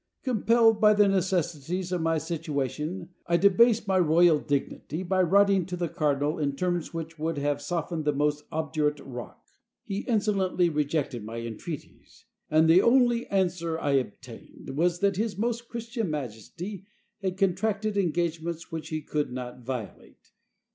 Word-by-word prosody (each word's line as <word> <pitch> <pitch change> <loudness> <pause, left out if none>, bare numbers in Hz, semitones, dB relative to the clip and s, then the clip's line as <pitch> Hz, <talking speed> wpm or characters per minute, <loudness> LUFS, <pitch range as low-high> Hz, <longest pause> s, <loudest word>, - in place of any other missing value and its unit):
Compelled 230 -2 +3
by 210 0 +6
the 205 0 +5
necessities 180 -2 -1
of 180 -2 0
my 165 0 +1
situation 155 +1 -3 0.2
I 170 0 +3
debased 210 +3 +4
my 190 -1 +3
royal 165 -1 +5
dignity 145 +4 -3
by 185 +1 +1
writing 195 +1 +4
to 180 -1 -4
the 170 -2 -2
cardinal 150 +1 0
in 140 -2 -1
terms 175 +1 -1
which 165 -1 -6
would 160 0 -2
have 145 0 -1
softened 165 +1 -3
the 150 - +3
most 150 +1 0
obdurate 155 -2 -1
rock. 125 -3 -9 0.4
He 195 0 -3
insolently 200 -6 +1
rejected 145 -5 -1
my 110 +2 -6
entreaties; 115 +7 -8 0.2
and 155 +1 +4
the 170 +3 +7
only 240 0 +3
answer 175 -4 0
I 145 -3 -1
obtained 130 -6 -4
was 175 +3 +1
that 200 -2 +2
his 215 -2 -1
most 235 +2 -2
Christian 230 -3 -3
majesty 155 - -6 0.3
had 190 -1 -2
contracted 200 +3 0
engagements 170 -2 -1
which 160 -1 -5
he 155 -1 -3
could 150 -2 -2
not 125 0 -6
violate. 120 -7 -7
170 Hz, 150 wpm, -27 LUFS, 150-195 Hz, 0.4 s, the